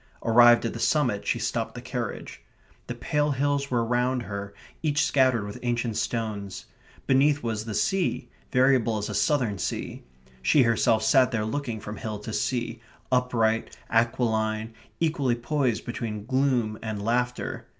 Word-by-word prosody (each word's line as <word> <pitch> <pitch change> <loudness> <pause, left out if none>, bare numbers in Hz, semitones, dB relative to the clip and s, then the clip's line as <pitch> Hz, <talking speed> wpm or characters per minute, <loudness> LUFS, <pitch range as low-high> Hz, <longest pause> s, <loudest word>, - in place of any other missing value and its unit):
Arrived 120 +1 +6
at 115 - -2
the 115 - -6
summit, 125 -7 +1
she - - +1
stopped 115 +1 -2
the - - -5
carriage. 125 -2 -5 0.5
The 120 - -4
pale 150 +4 0
hills 140 0 0
were 120 -2 +1
round 125 +1 0
her, 100 -2 -6 0.3
each 150 -2 +1
scattered 130 -6 +2
with 105 - -7
ancient 120 -2 -1
stones; 105 -6 -3 0.4
beneath 140 +2 +3
was 110 -2 -2
the 110 -2 -4
sea, 195 - 0 0.2
variable 125 -4 +3
as 105 - -3
a - - -4
southern 125 - +1
sea; - - -4 0.4
she 135 - +4
herself 115 -1 +2
sat 130 +3 +5
there 115 -4 -1
looking 120 -1 -3
from 105 0 -7
hill 110 -1 -4
to 105 +2 -7
sea, 120 -2 -2 0.3
upright, 120 -3 +1
aquiline, 115 -1 +1 0.3
equally 145 -7 +1
poised 125 -1 -1
between 110 -3 -4
gloom 130 -4 +1
and 105 -2 -4
laughter. 125 +1 -1
120 Hz, 150 wpm, -26 LUFS, 110-130 Hz, 0.5 s, Arrived